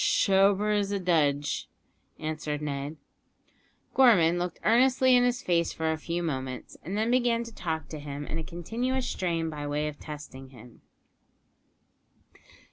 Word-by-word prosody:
"Shober 195 Hz, +2 st, +3 dB
as 200 Hz, -1 st, 0 dB
a 200 Hz, -, 0 dB
dudge," 150 Hz, -5 st, +1 dB, 0.5 s
answered 155 Hz, -1 st, -3 dB
Ned. 145 Hz, +1 st, -4 dB, 1.0 s
Gorman 180 Hz, -10 st, +5 dB
looked 175 Hz, -1 st, -3 dB
earnestly 255 Hz, +2 st, +4 dB
in 245 Hz, -, +5 dB
his 245 Hz, +2 st, 0 dB
face 170 Hz, -2 st, +1 dB
for 160 Hz, 0 st, -1 dB
a 160 Hz, -, -1 dB
few 170 Hz, +2 st, -3 dB
moments, 130 Hz, -5 st, -4 dB
and 195 Hz, +4 st, -4 dB
then 220 Hz, +2 st, +1 dB
began 240 Hz, -2 st, +2 dB
to 230 Hz, -1 st, -10 dB
talk 160 Hz, -6 st, -3 dB
to 155 Hz, -, -6 dB
him 145 Hz, 0 st, -6 dB
in 160 Hz, -, -4 dB
a -, -, -4 dB
continuous 235 Hz, +11 st, -2 dB
strain 165 Hz, -3 st, -1 dB
by 145 Hz, -1 st, -5 dB
way 150 Hz, +1 st, -1 dB
of 150 Hz, -1 st, -7 dB
testing 145 Hz, -3 st, -9 dB
him. 120 Hz, -2 st, -15 dB
170 Hz, 150 wpm, -28 LUFS, 150-210 Hz, 1.0 s, Gorman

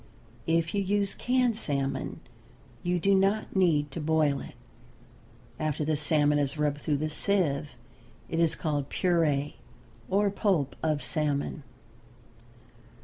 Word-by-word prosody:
If 165 Hz, 0 st, +1 dB
you 200 Hz, -, +1 dB
use 200 Hz, 0 st, 0 dB
canned 250 Hz, -2 st, +1 dB
salmon 140 Hz, -8 st, -2 dB, 0.6 s
you 175 Hz, 0 st, 0 dB
do 195 Hz, +4 st, +3 dB
not 195 Hz, +3 st, +1 dB
need 155 Hz, -6 st, +2 dB
to 160 Hz, -, -5 dB
boil 150 Hz, -2 st, +2 dB
it. -, -, -10 dB, 1.0 s
After 155 Hz, -1 st, -1 dB
the 155 Hz, 0 st, +1 dB
salmon 150 Hz, 0 st, +2 dB
is 145 Hz, +1 st, -1 dB
rubbed 145 Hz, -1 st, 0 dB
through 145 Hz, -1 st, 0 dB
the 155 Hz, +2 st, -1 dB
sieve 150 Hz, -7 st, 0 dB, 0.5 s
it 165 Hz, -, -2 dB
is 165 Hz, -1 st, +3 dB
called 145 Hz, -3 st, -2 dB
puree 155 Hz, -6 st, +1 dB, 0.5 s
or 200 Hz, +1 st, +2 dB
pulp 190 Hz, -9 st, 0 dB
of 155 Hz, -2 st, 0 dB
salmon. 150 Hz, -2 st, -1 dB
155 Hz, 130 wpm, -28 LUFS, 145-190 Hz, 1.0 s, do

